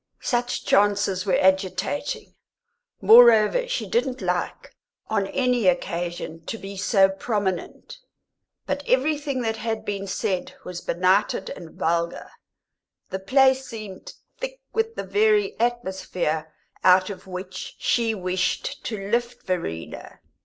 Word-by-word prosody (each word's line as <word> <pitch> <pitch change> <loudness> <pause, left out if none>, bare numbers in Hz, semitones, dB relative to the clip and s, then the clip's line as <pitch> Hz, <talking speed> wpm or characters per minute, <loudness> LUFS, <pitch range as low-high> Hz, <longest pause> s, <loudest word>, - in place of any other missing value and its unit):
Such 245 -1 -1
chances 200 -2 +2
were 185 - +3
agitating; 190 +8 0 0.7
moreover, 235 - +7
she - - -2
didn't 265 - 0
like, - - -3 0.4
on 200 -3 +1
any 250 -3 +1
occasion, 170 -2 -1
to 225 - -3
be 195 -1 -8
so 195 0 +4
prominent. 195 - -3 0.7
But 285 - -2
everything 280 0 +1
that 225 -1 -1
had 225 0 -3
been 200 -1 -3
said 190 -1 -2
was 180 -1 -6
benighted 190 +3 +1
and 165 -2 -10
vulgar; 170 +1 -1 0.8
the 190 - -2
place 265 +5 +3
seemed 215 -5 -8 0.3
thick - - -5
with 450 0 -1
the - - -3
very 420 -1 +2
atmosphere 190 -9 -1 0.3
out 185 +2 +5
of 195 - -10
which 185 0 -7
she 230 -2 +1
wished 185 -1 -2
to 220 - -3
lift 240 +1 -1
Verena. 125 - -5
205 Hz, 120 wpm, -24 LUFS, 185-245 Hz, 0.8 s, moreover